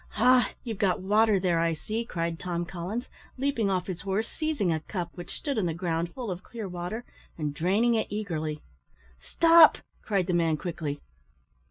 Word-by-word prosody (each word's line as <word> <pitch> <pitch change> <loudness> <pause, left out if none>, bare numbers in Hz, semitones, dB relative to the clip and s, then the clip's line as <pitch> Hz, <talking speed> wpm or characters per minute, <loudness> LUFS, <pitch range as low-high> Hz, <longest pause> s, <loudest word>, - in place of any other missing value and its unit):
"Ha! 250 +3 +5
you've 225 -5 -5
got 190 -3 +2
water 210 +1 +3
there, 175 -3 +1
I 165 0 +1
see," 220 +8 -3
cried 170 -5 -3
Tom 175 -1 -2
Collins, 185 +7 -4 0.3
leaping 255 -6 0
off 185 -2 0
his 180 -3 -5
horse, 200 +3 -1
seizing 300 - -1
a 160 - -1
cup 175 +1 -5
which 175 -1 -8
stood 280 -6 -2
on 185 - +1
the 165 - -2
ground 170 -1 -1
full 240 -3 -5
of 180 0 -5
clear 225 0 -7
water, 180 +6 -5 0.3
and 150 -3 -2
draining 200 +10 +2
it 220 - +1
eagerly. 160 -8 -3 0.6
"Stop!" 330 - +6 0.2
cried 195 -4 0
the 180 - -1
man, 165 -2 +2
quickly. 160 -5 -4
185 Hz, 180 wpm, -28 LUFS, 170-225 Hz, 0.6 s, Stop